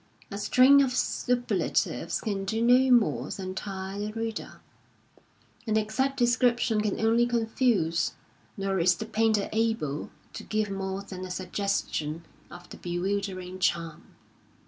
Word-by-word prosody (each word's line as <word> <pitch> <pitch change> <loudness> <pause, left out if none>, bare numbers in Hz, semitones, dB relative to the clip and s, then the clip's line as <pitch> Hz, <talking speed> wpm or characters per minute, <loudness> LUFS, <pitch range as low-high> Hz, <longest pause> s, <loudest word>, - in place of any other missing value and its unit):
A 200 - -4
string 260 +6 +6
of 260 -2 +1
superlatives 245 -1 0
can 200 -3 -2
do 220 +3 -2
no 250 +2 +5
more 240 -4 +3
than 185 -1 -5
tire 190 0 -5
the 210 +1 -3
reader, 225 0 -5 1.1
an 220 0 +2
exact 255 +6 0
description 240 -2 +2
can 210 -2 -1
only 230 +2 +3
confuse; 225 -7 +1 0.4
nor 195 -1 -1
is 180 +1 +4
the 220 - -5
painter 220 -2 +1
able 220 -11 -1 0.2
to - - -7
give 215 -1 -1
moi*e 195 0 -3
than 185 -1 -7
a 185 - -6
suggestion 180 -4 -2 0.2
of 175 0 -12
the - - -9
bewildering 185 +1 -3
charm. 165 -3 -2
205 Hz, 135 wpm, -27 LUFS, 185-230 Hz, 1.1 s, string